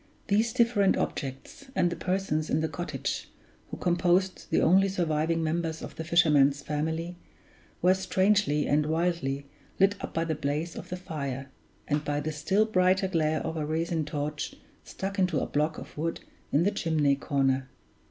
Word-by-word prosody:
These 220 Hz, +3 st, +3 dB
different 230 Hz, -6 st, +3 dB
objects, 135 Hz, -, -4 dB
and 175 Hz, -, +2 dB
the -, -, -2 dB
persons 180 Hz, -5 st, -1 dB
in 155 Hz, -, +1 dB
the 160 Hz, -, +1 dB
cottage, 165 Hz, +4 st, -4 dB, 0.4 s
who -, -, -6 dB
composed 180 Hz, +1 st, +1 dB
the -, -, +3 dB
only 190 Hz, +3 st, +5 dB
surviving 165 Hz, -2 st, 0 dB
members 160 Hz, 0 st, -2 dB
of -, -, -8 dB
the 160 Hz, -, -5 dB
fisherman's 145 Hz, -4 st, +4 dB
family, 160 Hz, +3 st, -2 dB, 0.7 s
were 180 Hz, +1 st, +6 dB
strangely 190 Hz, -4 st, +2 dB
and 150 Hz, +1 st, +2 dB
wildly 160 Hz, -4 st, 0 dB, 0.3 s
lit 195 Hz, +1 st, +5 dB
up -, -, -4 dB
by 165 Hz, -, 0 dB
the 160 Hz, -, -1 dB
blaze 150 Hz, +3 st, -2 dB
of -, -, -8 dB
the 180 Hz, -, -4 dB
fire 140 Hz, -6 st, -5 dB, 0.4 s
and 145 Hz, 0 st, 0 dB
by 145 Hz, 0 st, -1 dB
the 155 Hz, +2 st, -2 dB
still 190 Hz, +8 st, +2 dB
brighter 190 Hz, -2 st, +3 dB
glare 160 Hz, -4 st, +1 dB
of 160 Hz, 0 st, -3 dB
a 155 Hz, -, -1 dB
resin 160 Hz, +1 st, -1 dB
torch 150 Hz, 0 st, -4 dB, 0.3 s
stuck 195 Hz, +1 st, -5 dB
into 180 Hz, -4 st, +2 dB
a -, -, -1 dB
block 155 Hz, +2 st, 0 dB
of -, -, -10 dB
wood 165 Hz, +2 st, -2 dB, 0.3 s
in 150 Hz, -, +3 dB
the 200 Hz, -, +2 dB
chimney 155 Hz, -8 st, +2 dB
corner. 135 Hz, -2 st, 0 dB
160 Hz, 170 wpm, -28 LUFS, 150-185 Hz, 0.7 s, were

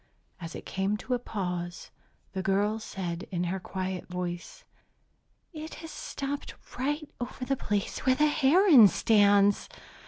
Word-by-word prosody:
As 165 Hz, -2 st, -7 dB
it -, -, -8 dB
came 195 Hz, +2 st, -1 dB
to 255 Hz, -, -3 dB
a 245 Hz, -, +1 dB
pause, 180 Hz, -6 st, -4 dB, 0.4 s
the 190 Hz, -, -2 dB
girl 205 Hz, +3 st, +1 dB
said 180 Hz, -5 st, -5 dB
in 180 Hz, -2 st, -2 dB
her 180 Hz, +2 st, -2 dB
quiet 185 Hz, 0 st, -4 dB
voice, 180 Hz, -1 st, -5 dB, 0.9 s
"It 315 Hz, 0 st, -7 dB
has 325 Hz, 0 st, -9 dB
stopped 280 Hz, +1 st, -5 dB, 0.2 s
right 295 Hz, +3 st, -1 dB
over 250 Hz, +1 st, -5 dB
the 275 Hz, -, +1 dB
place 205 Hz, -5 st, -2 dB
where 260 Hz, -1 st, +3 dB
the 300 Hz, +3 st, +3 dB
heron 295 Hz, -, +7 dB
stands!" 205 Hz, -1 st, +4 dB
205 Hz, 145 wpm, -29 LUFS, 185-265 Hz, 0.9 s, heron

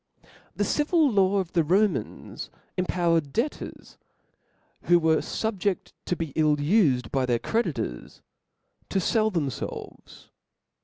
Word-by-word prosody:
The -, -, 0 dB
civil 300 Hz, -1 st, +2 dB
law 200 Hz, -1 st, +3 dB
of 185 Hz, -3 st, -2 dB
the 170 Hz, -, +4 dB
Rohiahs 190 Hz, +6 st, -1 dB, 0.3 s
empowered 170 Hz, -5 st, +1 dB
debtors; 250 Hz, -, -4 dB, 0.9 s
who 175 Hz, -, +6 dB
were 160 Hz, -1 st, +3 dB
fubjefl: 205 Hz, -3 st, -2 dB
to 180 Hz, -, -1 dB
be 165 Hz, -5 st, -5 dB
ill 155 Hz, -2 st, +3 dB
ufed 145 Hz, -, +2 dB
by 130 Hz, -2 st, 0 dB
their 120 Hz, -1 st, +2 dB
creditors, 135 Hz, -, -3 dB, 0.7 s
to 195 Hz, -, +1 dB
fell 220 Hz, +4 st, +2 dB
themfelves. 155 Hz, -, -5 dB
175 Hz, 115 wpm, -26 LUFS, 150-210 Hz, 0.9 s, who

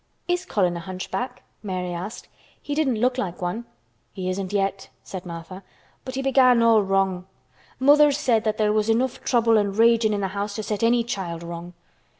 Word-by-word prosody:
"Is 355 Hz, +1 st, 0 dB
Colin 185 Hz, -, +1 dB
a -, -, -4 dB
hunchback?" 190 Hz, +8 st, -5 dB, 0.2 s
Mary 185 Hz, -3 st, -3 dB
asked. 185 Hz, +7 st, -6 dB, 0.3 s
"He 290 Hz, -, -5 dB
didn't 275 Hz, -7 st, +1 dB
look 250 Hz, +2 st, +1 dB
like 180 Hz, -5 st, -3 dB
one." 185 Hz, +7 st, -3 dB, 0.5 s
"He 185 Hz, -2 st, -3 dB
isn't 185 Hz, 0 st, -4 dB
yet," 195 Hz, -1 st, -1 dB
said 185 Hz, -2 st, -8 dB
Martha. 170 Hz, +2 st, -8 dB, 0.4 s
"But 260 Hz, 0 st, -6 dB
he 270 Hz, -, -2 dB
began 255 Hz, -3 st, +5 dB
all 225 Hz, -2 st, +5 dB
wrong. 190 Hz, -2 st, 0 dB, 0.5 s
Mother 290 Hz, +2 st, +6 dB
said 250 Hz, -6 st, +1 dB
that 215 Hz, 0 st, 0 dB
there 210 Hz, -1 st, +2 dB
was 215 Hz, 0 st, +1 dB
enough 245 Hz, +3 st, 0 dB
trouble 230 Hz, -3 st, +3 dB
and 200 Hz, -1 st, -2 dB
raging 230 Hz, -1 st, +4 dB
in 205 Hz, -, -1 dB
th' 190 Hz, -1 st, -2 dB
house 200 Hz, +1 st, -3 dB
to 215 Hz, -, -4 dB
set 210 Hz, 0 st, -3 dB
any 235 Hz, +1 st, +3 dB
child 180 Hz, -7 st, -4 dB
wrong. 170 Hz, +1 st, -7 dB
210 Hz, 185 wpm, -24 LUFS, 185-240 Hz, 0.5 s, Mother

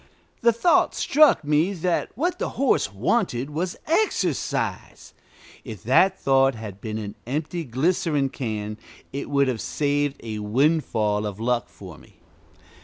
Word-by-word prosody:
The 235 Hz, -, +5 dB
thought 235 Hz, +10 st, +2 dB
struck 300 Hz, -, +4 dB
me 150 Hz, +6 st, +2 dB
that 180 Hz, -1 st, -1 dB
what 345 Hz, -, -1 dB
the -, -, -1 dB
horse 265 Hz, -, +2 dB
wanted 130 Hz, -, 0 dB
was 175 Hz, +4 st, -3 dB
exercise. 380 Hz, +8 st, -1 dB, 0.5 s
If -, -, -9 dB
that 195 Hz, -, +3 dB
thought 135 Hz, -1 st, +3 dB
had 105 Hz, -3 st, -8 dB
been 110 Hz, -1 st, -4 dB
an 105 Hz, -2 st, -5 dB
empty 155 Hz, +5 st, -3 dB
glycerin 145 Hz, +1 st, 0 dB
can, 110 Hz, -5 st, -4 dB, 0.3 s
it 140 Hz, -, -4 dB
would 140 Hz, -1 st, +2 dB
have 120 Hz, -4 st, -2 dB
saved 145 Hz, -1 st, -1 dB
a 110 Hz, -2 st, -5 dB
windfall 110 Hz, -3 st, +1 dB
of 100 Hz, 0 st, -7 dB
luck 120 Hz, +1 st, 0 dB
for -, -, -12 dB
me. -, -, -20 dB
140 Hz, 140 wpm, -24 LUFS, 110-170 Hz, 0.5 s, The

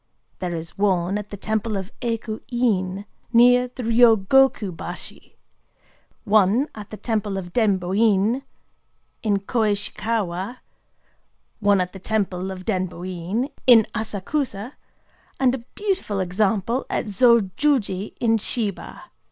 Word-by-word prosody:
There 175 Hz, -2 st, -3 dB
is 165 Hz, +3 st, -7 dB
one 190 Hz, -1 st, +1 dB
at 210 Hz, -, -8 dB
the 205 Hz, -, -7 dB
temple 215 Hz, +1 st, -2 dB
of 190 Hz, +2 st, -6 dB
Ekō 230 Hz, -2 st, -3 dB
In, 200 Hz, -6 st, 0 dB, 0.3 s
near 245 Hz, +1 st, +6 dB
Ryōgoku 230 Hz, -3 st, +3 dB
bashi; -, -, -8 dB, 0.9 s
one 215 Hz, +5 st, +3 dB
at 210 Hz, -1 st, -9 dB
the 215 Hz, -, -8 dB
temple 210 Hz, -4 st, -2 dB
of 175 Hz, -2 st, -6 dB
Denbō 195 Hz, -5 st, +1 dB
In, 220 Hz, +3 st, +3 dB, 0.8 s
in 205 Hz, -3 st, +1 dB
Koishikawa; 205 Hz, -1 st, -1 dB, 1.0 s
one 205 Hz, -2 st, +3 dB
at 180 Hz, 0 st, -2 dB
the 195 Hz, -, -9 dB
temple 190 Hz, -2 st, -1 dB
of 185 Hz, -1 st, -7 dB
Denbō 185 Hz, -3 st, -2 dB
In, 185 Hz, +9 st, -2 dB, 0.2 s
in 230 Hz, -4 st, +8 dB
Asakusa; 220 Hz, +2 st, -3 dB, 0.7 s
and 260 Hz, -2 st, +3 dB
a 265 Hz, -, -2 dB, 0.2 s
beautiful 380 Hz, -, -1 dB
example 205 Hz, +6 st, 0 dB
at -, -, -1 dB
Zōjōji 215 Hz, 0 st, +2 dB
in 225 Hz, -1 st, +2 dB
Shiba. 210 Hz, -2 st, -3 dB
210 Hz, 120 wpm, -23 LUFS, 190-235 Hz, 1.0 s, in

